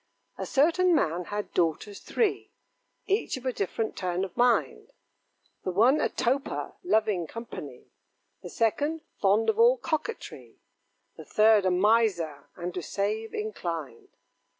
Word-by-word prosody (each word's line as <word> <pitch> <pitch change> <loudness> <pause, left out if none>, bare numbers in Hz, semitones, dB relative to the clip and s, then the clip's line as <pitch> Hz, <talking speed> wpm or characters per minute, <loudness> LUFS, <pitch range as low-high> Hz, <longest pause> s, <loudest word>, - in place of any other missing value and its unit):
A - - -3
certain 340 +5 +3
man 175 - 0
had 205 +2 -5
daughters 180 +4 -1
three, 435 -4 -1 0.6
Each 400 -7 0
of 260 - -11
a 255 - 0
different 220 +2 -2
turn 180 0 -2
of 185 - -11
mind: 245 0 +1 0.7
The - - -2
one 235 +11 +4
a - - +1
toper, 270 +4 -1
loving 215 - +1
company; 230 +7 -9 0.5
The - - -8
second, 290 +8 0 0.2
fond 205 +3 +3
of 440 - +1
all 485 +2 +6
coquetry; 420 +2 -5 0.6
The - - -10
third 215 -2 +4
a - - +4
miser, 185 -6 +1
and 175 0 -5
to 180 - -3
save 210 +5 -3
inclined. 170 - -5
220 Hz, 135 wpm, -27 LUFS, 185-285 Hz, 0.7 s, all